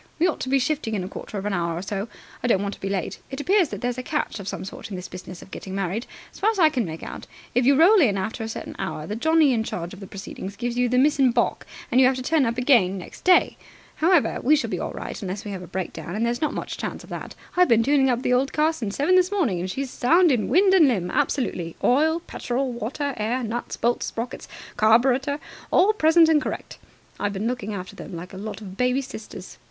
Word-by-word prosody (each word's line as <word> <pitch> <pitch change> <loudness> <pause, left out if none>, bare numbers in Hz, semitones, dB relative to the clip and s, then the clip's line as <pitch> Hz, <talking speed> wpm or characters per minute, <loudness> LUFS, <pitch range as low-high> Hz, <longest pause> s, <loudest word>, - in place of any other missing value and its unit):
"We 330 - +3
ought 360 - 0
to 260 - -4
be 275 - +4
shifting 265 -4 -1
in 190 - -2
a - - -5
quarter 205 - -7
of 195 - -4
an 210 - -1
hour 170 -2 -1
or 175 - -4
so. 200 +1 -3 0.3
I 245 - -1
don't 200 -5 +2
want 200 0 -3
to - - -12
be 195 - -2
late. 190 -4 -3
It 270 - -6
appears 370 +1 +3
that - - -6
there's 245 0 -2
a - - -2
catch 295 -4 -2
of 195 - -8
some 190 - -4
sort 220 +3 -8
in 200 - -5
this 180 0 -6
business 180 -1 -9
of 190 - -17
getting 190 0 -7
married. 195 +4 -2 0.3
As - - -13
far 420 - +3
as 445 - -1
I 325 -4 +6
can 255 -7 -1
make 160 -1 -7
out, - - -8 0.3
if 245 +1 +2
you 280 - +6
roll 365 +7 +6
in 210 -9 +3
after 220 +4 -3
a 220 - -4
certain - - -6
hour, 190 -5 -4
the 205 - -4
Johnnie 315 +3 +4
in 225 -2 +1
charge 175 -5 -5
of 195 - -10
the 195 - -9
proceedings 195 0 -7
gives 240 0 -3
you 245 0 +2
the 250 - +1
miss 290 +3 +3
in 265 -2 +5
baulk, 240 0 0 0.2
and 255 - +5
you 255 - +7
have 260 - +2
to 255 - -5
turn 295 -1 +2
up 235 +1 -2
again 235 -8 +4
next 180 - -10
day. 365 0 +4 0.4
However, 335 -1 +3
we 300 +5 +5
shall 305 - -2
be - - -2
all - - -3
right - - -6
unless 195 +1 -5
we 205 - -5
have 190 -2 -5
a 180 - -9
breakdown, 180 0 -5
and 225 +2 0
there's 240 +1 -1
not 305 -1 0
much - - -5
chance - - -5
of - - -15
that. - - -6 0.2
I've 360 0 +4
been 230 -1 +5
tuning 270 +1 +3
up 245 0 0
the 250 - +2
old 265 +3 +1
car 310 +2 +2
since 220 -10 -4
seven 295 +6 +2
this 370 0 +5
morning, 290 - +1
and 185 +2 -3
she's 265 +5 -3
sound 335 +6 +4
in 240 -5 +1
wind 380 +2 +5
and 340 -6 +7
limb, 185 -9 0
absolutely. 230 - -1
Oil 315 +6 +3
petrol 255 -4 -3
water 270 +5 -3
air 235 +4 -1
nuts 235 +2 -4
bolts 240 +1 0
sprockets 235 +2 -5 0.3
carburetor 255 +6 +3 0.3
all 395 +4 +4
present 325 -3 +5
and 315 -2 +4
correct. - - -5 0.4
I've 205 0 -1
been 200 +2 -3
looking 230 -4 -2
after 185 -1 -7
them - - -8
like 175 +3 -8
a - - -7
lot 215 +3 -6
of 190 -3 -9
baby 250 +2 +1
sisters. 215 -6 -9
245 Hz, 265 wpm, -24 LUFS, 200-290 Hz, 0.4 s, you